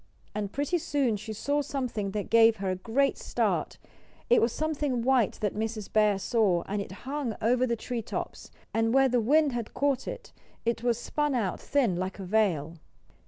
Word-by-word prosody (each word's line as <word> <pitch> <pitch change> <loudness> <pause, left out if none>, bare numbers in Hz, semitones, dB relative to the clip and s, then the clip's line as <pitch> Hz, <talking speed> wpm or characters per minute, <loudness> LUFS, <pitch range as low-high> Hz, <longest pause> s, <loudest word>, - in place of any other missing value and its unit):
And 205 -2 -3
pretty 290 +5 0
soon 275 -7 0
she 215 +2 -6
saw 285 +7 0
something 250 -8 -3
that 205 0 -4
gave 230 0 +6
her 195 -2 -2
a - - -1
great 235 +9 0
start. - - -1 0.5
It 245 - +6
was 230 - +2
something 290 -5 -1
white 255 -4 +3
that 210 -2 0
Mrs. 220 -1 -4
Bear 210 -2 +4
saw, 195 -4 +1
and 205 +1 -2
it 200 - -7
hung 270 -5 -2
over 250 +3 +2
the 235 - 0
tree 235 +1 -4
tops; - - -6 0.2
and 225 +2 +1
where 270 0 +6
the 245 -2 +2
wind 295 +5 +3
had 235 -3 -5
caught 275 -2 0
it - - -7 0.3
it 230 0 0
was 240 -1 +1
spun 295 +3 -1
out 205 -7 -1
thin, 245 -11 +1
like 185 +1 -3
a 195 - -6
veil. 175 -6 +1
230 Hz, 190 wpm, -28 LUFS, 210-265 Hz, 0.5 s, gave